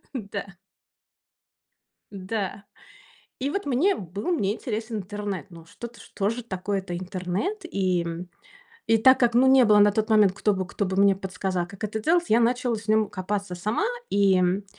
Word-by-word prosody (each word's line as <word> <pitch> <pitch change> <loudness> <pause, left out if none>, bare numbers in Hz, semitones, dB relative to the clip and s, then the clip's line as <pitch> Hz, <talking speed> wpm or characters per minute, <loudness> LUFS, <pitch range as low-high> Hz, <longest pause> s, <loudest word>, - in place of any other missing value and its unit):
да. 200 -4 -6 1.6
Да. 200 +1 -4 0.8
И 275 +2 -1
вот 395 +2 -3
мне 290 +9 +2
был 195 - -7
мне 205 - +1
интересен 220 -2 -4
интернет. 205 0 -5
Ну, 165 -2 -13
что-то, 235 +7 -10
что 200 0 -2
же 235 +1 -4
такое 195 -1 -3
это 175 -2 -5
интернет 185 - -3
и, 185 - 0
м? 170 +2 -6 0.6
И 225 - +4
так 260 +4 +6
как, 240 -1 +3
ну, 255 +2 +5
не 260 -1 +6
было 210 -1 +5
на 205 0 +6
тот 220 +1 -1
момент, 210 -3 +5
кто 205 +2 +1
бы 185 -1 -3
кто 200 - -3
бы 190 0 -3
мне 200 0 +5
подсказал, 190 -2 -3
как 200 +2 -8
это 215 +1 -3
делать, 345 +8 +2
я 230 +2 +4
начала 245 0 +1
с 215 +1 -10
ним 215 -1 +3
копаться 200 -1 -4
сама 215 - -1 0.3
и, 200 -2 +4
м. 180 +2 +1
205 Hz, 180 wpm, -25 LUFS, 190-230 Hz, 1.6 s, так